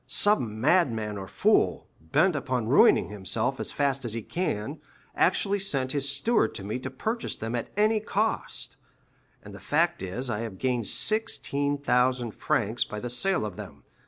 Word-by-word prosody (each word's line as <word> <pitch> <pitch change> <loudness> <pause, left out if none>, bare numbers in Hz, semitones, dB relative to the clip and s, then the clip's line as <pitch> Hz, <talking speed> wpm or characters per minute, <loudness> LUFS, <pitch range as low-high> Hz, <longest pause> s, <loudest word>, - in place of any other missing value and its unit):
Some 120 - +3
madman 115 - +2
or 95 -1 -6
fool, - - +2 0.2
bent 155 - +2
upon 130 -5 -2
ruining 135 - +5
himself 110 +6 -2
as - - -3
fast 140 -2 0
as 115 -3 -3
he 115 -1 -4
can, 150 - -3 0.3
actually 200 0 +2
sent 135 -9 0
his 140 -1 0
steward 220 - +2
to 95 - -6
me 105 +5 -3
to 130 - -5
purchase 220 - -3
them 115 +1 -5
at 120 - -3
any 215 +1 +3
cost; 215 +1 -2 0.7
and - - -11
the - - -10
fact - - +1
is, 100 +8 -4
I 105 -4 -2
have 110 -4 -5
gained 125 -3 -1
16,000 140 - +1
francs 110 +2 0
by 105 - -7
the 120 +2 -5
sale 190 - 0
of 100 -4 -6
them. - - -10
130 Hz, 165 wpm, -27 LUFS, 110-155 Hz, 0.7 s, ruining